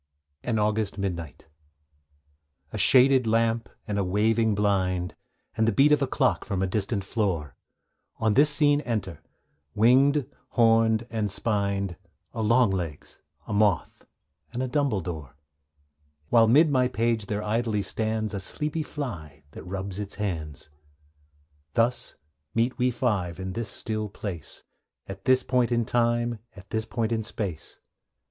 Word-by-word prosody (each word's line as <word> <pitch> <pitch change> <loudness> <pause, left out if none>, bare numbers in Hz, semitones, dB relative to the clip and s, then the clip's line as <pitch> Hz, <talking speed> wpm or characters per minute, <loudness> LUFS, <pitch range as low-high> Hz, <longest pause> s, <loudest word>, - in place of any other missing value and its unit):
AN 115 -2 0
AUGUST 105 -1 0
MIDNIGHT 85 -6 -5 1.3
A - - -3
shaded 130 -1 +5
lamp 115 +1 +1 0.2
and 105 -1 -1
a - - +1
waving 110 +3 +2
blind, 95 -3 0 0.4
And 110 - +2
the - - +4
beat 140 +8 +4
of 150 -1 +4
a 135 - +1
clock 130 0 +1
from 95 -2 -2
a - - +2
distant 100 +1 -1
floor; 95 - -2 0.6
On 110 -1 +1
this 145 +6 +6
scene 145 0 +3
enter 100 - -3 0.5
winged, 135 +6 +4 0.3
horned, 115 -1 +4
and 110 -2 -1
spined 100 -3 -1 0.4
A 115 - -3
longlegs, 100 - 0 0.3
a - - -5
moth, 105 -4 +1 0.4
and 125 - -2
a - - -1
dumbledore; 95 - -2 0.9
While 115 -1 +5
'mid 150 +7 +5
my 130 -2 +3
page 115 -3 0
there 105 0 -2
idly 110 -1 0
stands 110 0 -2
A 100 - -2
sleepy 150 +10 -2
fly, 85 - -6
that - - -10
rubs 95 +1 -5
its 100 -1 -5
hands. 80 -8 -5 1.0
Thus 120 +2 +1 0.4
meet 120 +2 +1
we 125 +1 +3
five, 105 -8 -1
in 95 0 -4
this 115 +1 -3
still 110 0 -2
place, 95 -5 -6 0.4
At 95 +1 -9
this 130 -1 +4
point 125 -2 +1
of 120 -1 +1
time, 120 0 +1 0.2
at 95 -1 -14
this 110 0 -1
point 115 0 -2
in 115 -1 0
space. 100 -7 -5
110 Hz, 140 wpm, -26 LUFS, 95-120 Hz, 1.3 s, this